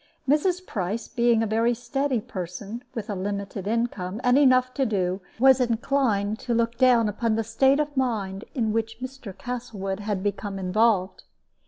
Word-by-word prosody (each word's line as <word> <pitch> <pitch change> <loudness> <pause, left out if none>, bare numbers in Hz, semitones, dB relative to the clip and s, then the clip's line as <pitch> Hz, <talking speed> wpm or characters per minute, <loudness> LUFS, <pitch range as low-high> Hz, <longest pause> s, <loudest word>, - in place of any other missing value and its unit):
Mrs. 350 +6 +2
Price, 210 - -3
being 235 -2 +2
a - - +1
very 225 +3 +1
steady 250 +1 -1
person, 195 +6 -6
with 225 -3 -4
a 210 - -3
limited 200 0 -4
income, 215 -4 -2
and 250 0 +4
enough 255 -2 +4
to 275 - 0
do, 190 -5 0 0.2
was 265 +2 +6
inclined 230 -4 +1
to 245 -3 -2
look 230 0 +1
down 245 -4 +5
upon 220 +2 0
the 225 - 0
state 265 +6 +3
of 295 -1 -1
mind 215 -7 -1
in 225 -5 0
which 225 0 -2
Mr. 255 -6 -8
Castlewood 210 -6 -4 0.2
became 200 -1 -3
involved. 190 0 +1
225 Hz, 160 wpm, -25 LUFS, 200-255 Hz, 0.2 s, was